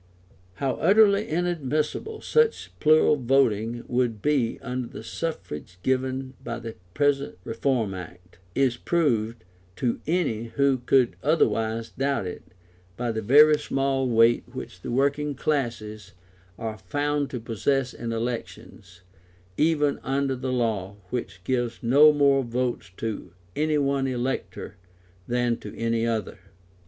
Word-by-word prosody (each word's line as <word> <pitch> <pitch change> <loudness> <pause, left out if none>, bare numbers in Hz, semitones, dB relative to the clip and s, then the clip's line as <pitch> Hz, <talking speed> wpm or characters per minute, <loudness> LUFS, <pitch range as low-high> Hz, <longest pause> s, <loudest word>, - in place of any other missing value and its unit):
How 130 +4 -1
utterly 205 0 +4
inadmissible 165 - -1
such 465 0 +1
plural 155 -1 +5
voting 120 -3 +1
would 120 -3 0
be 130 -2 +1
under 125 -1 -3
the - - -9
suffrage 110 - -5
given 130 0 -1
by - - -4
the 115 -1 -7 0.2
present 145 -4 +1
Reform 115 -2 -1
Act, 90 0 -10 0.2
is 130 -3 +2
proved, 120 -9 0 0.3
to 120 +1 -1
any 150 -10 0
who 140 -2 +3
could 125 0 +2
otherwise 115 -6 +1
doubt 135 -6 -1
it, 90 - -6 0.6
by 120 -1 -1
the 110 0 -3
very 150 +7 +6
small 135 -2 0
weight 115 0 +4
which 130 +1 -8
the - - -6
working 140 +3 +1
classes 110 -8 -2 0.4
are 110 -2 -5
found 145 +7 -1
to 125 - -4
possess 125 +4 -1
in 115 -1 -5
elections, 115 -6 -6 0.5
even 150 - +2
under 135 0 0
the 130 0 -3
law 110 -6 -1 0.2
which 100 -7 -4
gives 120 +1 -2
no 145 +6 +7
more 140 -2 +3
votes 120 -3 -2
to 110 -6 -5 0.2
any 155 0 +1
one 140 -1 +1
elector 130 +1 -3 0.5
than 120 -1 +1
to - - -10
any 115 0 0
other. 110 -4 -2
125 Hz, 130 wpm, -25 LUFS, 115-140 Hz, 0.6 s, no